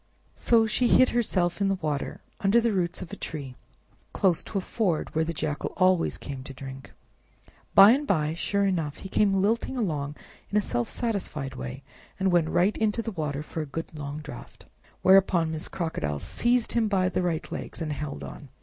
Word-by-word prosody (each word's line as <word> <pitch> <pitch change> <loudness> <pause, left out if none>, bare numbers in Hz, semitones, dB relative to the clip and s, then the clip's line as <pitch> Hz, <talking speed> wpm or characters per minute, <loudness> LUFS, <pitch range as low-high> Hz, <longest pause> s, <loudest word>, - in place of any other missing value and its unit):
So 230 -2 +3
she 240 +3 +1
hid 255 +2 +6
herself 195 -6 0
in 200 - +3
the 195 - +2
water, 150 -6 -3 0.2
under 200 +4 +4
the 230 -2 +1
roots 180 -2 -1
of 170 - -11
a - - -3
tree, 140 -5 -6 0.6
close 180 -4 +2
to 205 - -4
a - - +3
ford 185 -5 -1
where 160 - +2
the 165 - -2
Jackal 150 -2 -3
always 185 -2 +3
came 135 -2 -7
to 135 -2 -9
drink. 135 0 -9 0.8
By 200 +2 +10
and 285 +4 +1
by, 155 -4 +1
sure 200 +4 0
enough, 165 -6 -1
he 190 - -8
came 195 -1 +2
lilting 230 +5 0
along 150 - -2 0.3
in 210 - +1
a - - +6
self 120 - -1
satisfied 180 - -3
way, 130 +1 -7 0.4
and 190 -1 +2
went 170 -3 +3
right 180 +4 +2
into 220 +1 0
the 225 - -3
water 150 -5 -3
for 160 - -5
a 155 - -5
good 165 +4 -6
long 145 0 -6
draft. 145 -4 -11 0.4
Whereupon 185 -4 +5
Miss 160 -1 -4
Crocodile 160 - -3
seized 240 - +1
him 230 -2 +2
by 190 -3 +2
the 185 - 0
right 170 -3 -2
legs - - -6
and 155 -3 -2
held 145 0 -5
on. 145 - -9
175 Hz, 195 wpm, -27 LUFS, 150-200 Hz, 0.8 s, By